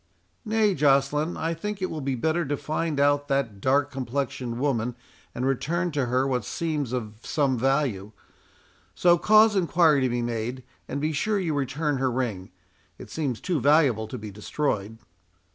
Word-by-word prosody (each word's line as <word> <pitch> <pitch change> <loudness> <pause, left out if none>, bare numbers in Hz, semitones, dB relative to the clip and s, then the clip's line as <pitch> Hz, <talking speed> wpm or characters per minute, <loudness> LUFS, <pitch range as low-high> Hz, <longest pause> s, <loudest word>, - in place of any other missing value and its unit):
"Nay, 215 -2 +2
Joceline, 145 +2 +2
I 165 +1 -1
think 205 +5 -5
it 185 - -2
will 155 - -4
be 135 -1 -1
better 160 +7 0
to 145 -1 -2
find 155 0 -2
out 145 0 +3
that 130 -8 -1
dark 140 +3 +2
complexioned 130 -2 -3
woman, 125 -4 0 0.4
and 125 - -2
return 170 +7 0
to 140 -4 -1
her 130 +2 +1
what 125 -4 0
seems 150 0 -2
of 110 -4 -4
some 140 -2 0
value. 125 -6 0 0.8
So, 175 -1 +4
cause 215 +2 +5
enquiry 170 -5 +3
to 130 - +2
be 120 0 -1
made, 120 +2 -3 0.2
and - - -3
be 155 +1 0
sure 205 +8 0
you 170 -5 -1
return 145 +1 -1
her 130 0 +1
ring. 115 -7 -3 0.5
It - - -11
seems 140 -7 -2
too 175 -5 -1
valuable 140 -7 +3
to 125 - -6
be 105 -2 -8
destroyed." 105 0 -2
140 Hz, 170 wpm, -26 LUFS, 125-160 Hz, 0.8 s, cause